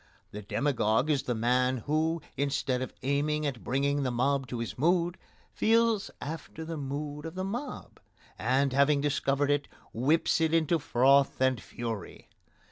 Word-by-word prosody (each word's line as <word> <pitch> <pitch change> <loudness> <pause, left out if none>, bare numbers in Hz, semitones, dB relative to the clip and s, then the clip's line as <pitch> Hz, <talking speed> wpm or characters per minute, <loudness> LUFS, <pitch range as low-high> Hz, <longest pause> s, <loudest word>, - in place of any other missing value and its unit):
The 105 - -7
demagogue 125 +3 +1
is 140 -3 +2
the 125 -3 -2
man 125 +3 +2
who, 160 +2 0
instead 135 -2 -1
of 130 - -4
aiming 150 +3 0
at 135 -5 -3
bringing 140 +3 0
the 130 - 0
mob 130 +2 0
to 125 - -5
his 115 0 -4
mood, 170 +4 +2 0.4
feels 225 -2 +2
after 160 +1 -6
the 165 0 -5
mood 145 +1 -5
of 165 - -9
the 185 - -3
mob, 240 +8 -6 0.4
and, 130 +3 +1
having 140 +1 +4
discovered 140 0 +1
it, 145 0 0 0.3
whips 150 +8 +2
it 160 0 +2
into 165 +1 +2
froth 135 0 +3
and 130 -3 +2
fury. 110 +2 -6
140 Hz, 155 wpm, -29 LUFS, 130-155 Hz, 0.4 s, having